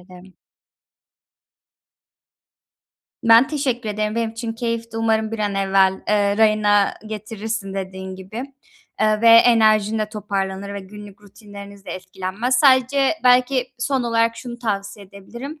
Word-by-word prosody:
ederim. 180 +1 -16 2.9
Ben 230 +2 +6
teşekkür 260 -6 -2
ederim. 210 0 -2
Benim 230 -1 -1
için 230 0 -5
keyifti. 230 -1 -4
Umarım 220 -1 0
bir 225 - -4
an 205 -1 -1
evvel, 195 -1 +3 0.2
eee, 205 -1 +2
rayına 210 -2 +3
getirirsin 215 -1 -5
dediğin 190 -1 -6
gibi. 190 +6 -7 0.6
Eee, 215 0 +2
ve 230 - +5
enerjin 220 -2 +5
de 215 -1 -2
toparlanır 200 -2 -4
ve 200 - -5
günlük 205 +1 -13
rutinleriniz 200 -1 -13
de - - -8
etkilenmez. 190 +7 -3
Sadece 265 0 +4
belki 250 +1 +3
son 260 +1 -1
olarak 230 -1 +1
şunu 240 0 -8
tavsiye 200 -3 -4
edebilirim. 235 +10 -10
215 Hz, 125 wpm, -20 LUFS, 200-230 Hz, 2.9 s, Ben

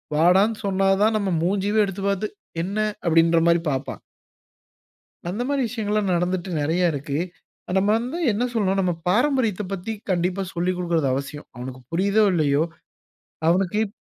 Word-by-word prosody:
வாடான்னு, 190 +7 +4
சொன்னா 195 0 +1 0.2
தான் 220 0 +3
நம் 200 -3 -1
மூஞ்சியே 200 +4 +1
எடுத்து 195 0 -6
பார்த்து, 200 +2 -1 0.4
"என்ன" 195 +4 -4 0.3
அப்டின்ற 165 0 +4
மாரி 170 0 +4
பார்ப்பான். 135 0 -4 1.3
அந்த 205 +7 -2
மாரி 280 -2 +1
விஷயங்கள்லாம் 210 -4 -1
நடந்துட்டு 180 +1 -1
நிறைய 165 +5 0
இருக்கு. 145 0 -3 0.6
நம்ம 190 +1 +2
வந்து 250 +8 -4
என்ன 215 +4 0
சொல்றோம் 195 -4 +1
நம்ம 180 -2 +1 0.2
பாரம்பரியத்தப் 220 -3 +1
பத்தி 195 +3 -4 0.2
கண்டிப்பா 180 +2 0
சொல்லி 175 +1 0
குடுக்கறது 170 -5 0
அவசியம். 140 +2 -5
அவனுக்கு 130 +1 -7
புரியுதோ 200 +5 +3
இல்லையோ. 150 -3 +2 0.9
அவனுக்கு 180 +3 +2
இப் 200 - -11
185 Hz, 140 wpm, -23 LUFS, 170-210 Hz, 1.3 s, வாடான்னு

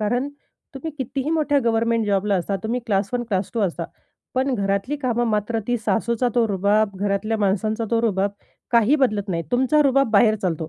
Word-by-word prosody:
कारण, 245 +6 0 0.5
तुम्ही 315 +4 -5
कितीही 270 +3 -3
मोठ्या 300 -3 +2
गव्हर्नमेंट 230 -1 +1
जॉबला 200 0 +1
असा, 190 +2 -1
तुम्ही 240 +3 -2
क्लास 200 -2 0
1 245 -1 0
क्लास 190 -2 -1
2 230 - 0
असा, 190 -4 -1 0.5
पण 265 +1 +1
घरातली 200 +7 -1
कामं 240 -4 0
मात्र 215 +2 0
ती 245 - +2
सासूचा 235 +2 +1
तो 235 -2 +3
रुबाब, 200 +2 +2
घरातल्या 205 +3 -1
माणसांचा 215 +3 0
तो 230 - +2
रुबाब, 200 -3 +1 0.4
काही 235 +5 +4
बदलत 215 -7 0
नाही. 165 -2 -1
तुमचा 260 +5 +3
रुबाब 275 -3 +2
बाहेर 215 +1 +5
चालतो. 165 -3 -2
225 Hz, 180 wpm, -22 LUFS, 200-245 Hz, 0.5 s, बाहेर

